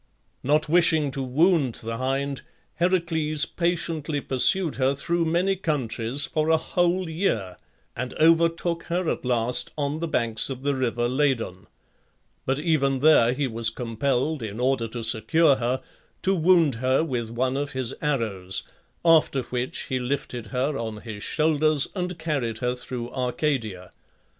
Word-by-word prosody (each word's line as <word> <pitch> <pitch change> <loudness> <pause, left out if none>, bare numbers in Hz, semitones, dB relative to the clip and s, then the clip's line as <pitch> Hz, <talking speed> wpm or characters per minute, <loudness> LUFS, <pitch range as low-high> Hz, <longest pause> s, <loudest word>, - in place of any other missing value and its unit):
Not 150 +3 +1
wishing 160 -3 +3
to 135 - -3
wound 140 0 +2
the 115 0 -5
hind 135 +2 -2 0.4
Heracles 165 -4 +1
patiently 165 -4 -2
pursued 155 +6 +3
her 135 +1 +1
through 170 +4 -1
many 175 +4 +1
countries 140 -6 -1
for 155 0 -1
a 160 - +5
whole 175 +3 0
year, 115 - -2 0.4
and 125 +1 -5
overtook 165 +1 +2
her 175 0 -2
at - - -2
last 125 -1 +2
on 145 +1 -2
the 170 - -2
banks 115 -6 +1
of 130 -1 -6
the 145 0 +1
river 120 -2 -1
Ladon; 125 -8 -1 0.8
but 135 +1 +1
even 140 -4 +1
there 140 -6 +5
he 140 +2 -1
was 115 -1 +1
compelled, 125 +5 -2
in 110 0 -6
order 125 -2 +1
to 115 +1 -6
secure 140 +7 +3
her, 125 +1 -2 0.4
to 190 - +2
wound 170 -4 +4
her 130 +4 +2
with 120 -8 -3
one 130 +3 -1
of 145 +1 -3
his 130 -3 -2
arrows, 110 -11 -1 0.4
after 155 -5 +4
which 125 +1 -3
he 130 - -2
lifted 125 -2 -4
her 135 +6 -1
on 110 -2 -5
his 110 -3 -8
shoulders 155 0 +2
and 180 -2 -3
carried 140 -9 -2
her 125 +1 -1
through 125 -1 -6
Arcadia. 125 - -2
140 Hz, 150 wpm, -25 LUFS, 120-160 Hz, 0.8 s, a